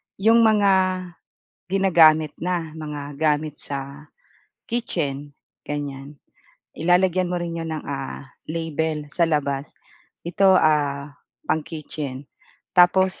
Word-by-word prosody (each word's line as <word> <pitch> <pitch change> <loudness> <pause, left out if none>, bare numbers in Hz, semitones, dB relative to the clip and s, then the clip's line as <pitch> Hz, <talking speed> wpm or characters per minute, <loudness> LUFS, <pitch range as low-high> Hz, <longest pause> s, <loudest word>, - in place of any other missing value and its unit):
yung 225 +4 +4
mga, 190 -4 +3 0.7
ginagamit 160 -6 +4
na, 170 -3 -2
mga 145 -2 -6
gamit 150 0 0
sa, 140 +1 -7 0.6
kitchen, 145 - -2 0.3
ganyan. 145 -1 -6 0.5
I 165 - -5
lalagyan 180 0 +3
mo 180 - -2
rin 170 -1 -4
iyon 165 -1 -4
ng - - -7
ah, 135 -1 -6 0.2
label 160 -2 -2
sa 170 -2 +2
labas. 140 -2 -1 0.6
Ito 190 +2 +4
ah, 145 -2 +1 0.3
pang-kitchen. 150 -3 -4 0.5
Tapos 185 +1 +4
155 Hz, 105 wpm, -23 LUFS, 145-180 Hz, 0.7 s, yung